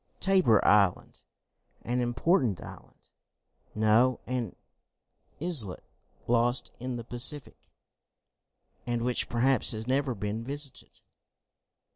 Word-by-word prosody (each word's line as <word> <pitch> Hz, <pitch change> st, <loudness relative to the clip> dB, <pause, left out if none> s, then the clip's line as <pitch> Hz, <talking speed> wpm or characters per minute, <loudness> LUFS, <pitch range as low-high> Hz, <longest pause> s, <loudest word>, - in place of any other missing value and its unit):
"Tabor 185 Hz, -, +3 dB
Island." 100 Hz, -3 st, +2 dB, 0.6 s
"An 125 Hz, +1 st, -2 dB
important 120 Hz, -, 0 dB
island?" -, -, -14 dB, 0.7 s
"No, 110 Hz, +4 st, +2 dB
an 125 Hz, -5 st, -4 dB, 0.8 s
islet 140 Hz, -, 0 dB, 0.4 s
lost 120 Hz, +1 st, 0 dB
in 125 Hz, 0 st, -5 dB
the 120 Hz, -, -6 dB
Pacific, 130 Hz, +5 st, +2 dB, 1.2 s
and 120 Hz, -1 st, -2 dB
which 125 Hz, 0 st, -1 dB
perhaps 125 Hz, +1 st, +2 dB
has 110 Hz, 0 st, -6 dB
never 135 Hz, -1 st, 0 dB
been 105 Hz, +2 st, -4 dB
visited." 140 Hz, +1 st, -5 dB
120 Hz, 95 wpm, -28 LUFS, 110-135 Hz, 1.2 s, Tabor